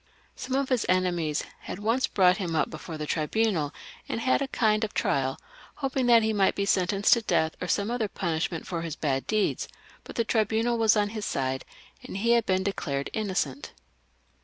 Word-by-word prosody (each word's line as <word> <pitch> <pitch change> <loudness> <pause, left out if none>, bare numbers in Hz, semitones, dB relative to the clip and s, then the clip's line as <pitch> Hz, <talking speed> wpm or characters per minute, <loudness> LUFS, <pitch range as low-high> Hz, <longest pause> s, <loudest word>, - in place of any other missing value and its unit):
Some 260 0 -4
of 275 -1 0
his 255 -3 +2
euemies 175 -4 +1 0.2
had - - -7
once 230 +6 +1
brought 180 -1 +4
him 175 -5 -2
up 155 - +1
before 160 0 -7
the 155 - -4
tribunal 160 0 0 0.4
and - - -2
had 255 +3 +2
a 275 - 0
kind 215 -4 +2
of 220 - -4
trial, 135 -1 0 0.4
hoping 265 -3 -1
that 235 -2 +6
he 220 0 +1
might 195 -2 +2
be 200 - 0
sentenced 195 +1 +3
to 235 - +2
death 160 -7 +1
or 180 - -2
some 205 +4 0
other 240 -3 0
punishment 165 -3 -2
for 170 -2 -3
his 165 -2 -4
bad 135 -4 -1
deeds; 215 -1 0 0.4
but - - -10
the 230 - +2
tribunal 225 +2 +1
was 220 -1 +4
on 205 0 +2
his 215 -1 -4
side, 130 -1 -2 0.4
and - - -7
he 230 +4 +1
had 235 -2 +3
been 185 0 +2
declared 140 -8 -2
innocent. 185 -10 -2
200 Hz, 195 wpm, -27 LUFS, 165-225 Hz, 0.4 s, that